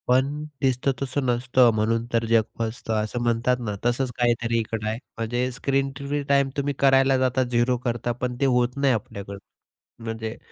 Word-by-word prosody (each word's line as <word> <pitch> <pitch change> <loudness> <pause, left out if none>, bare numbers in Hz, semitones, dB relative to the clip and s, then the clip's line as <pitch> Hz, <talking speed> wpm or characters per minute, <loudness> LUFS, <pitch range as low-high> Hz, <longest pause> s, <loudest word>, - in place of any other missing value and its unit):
पण 130 +3 +3 0.3
दिसतं 130 0 +2
तसं 140 0 -1
नसतं, 125 0 +3
म्हणून 115 +2 +1
तर 115 0 +2
जग 115 0 +4 0.2
फसतं. 115 0 -3
असं 110 +3 -3
म्हणतात 120 +1 +1
ना, 105 -4 -3
तसंच 125 +1 +1
काहीतरी 120 -1 +1
इकडे 110 -1 -3
आहे. 110 - -2 0.2
म्हणजे 120 +3 -1
स्क्रीन 135 +2 0
फ्री 145 +2 -2
टाईम 140 -1 +3
तुम्ही 140 0 0
करायला 135 -1 +4
जाता, 130 0 +2
झीरो 125 0 +1
करता, 120 0 -1
पण 125 +1 -3
ते - - +4
होत 125 0 +2
नाही 140 -2 +3
आपल्याकडं 100 -2 -5 0.7
म्हणजे, 110 0 -5
125 Hz, 170 wpm, -24 LUFS, 115-135 Hz, 0.7 s, जग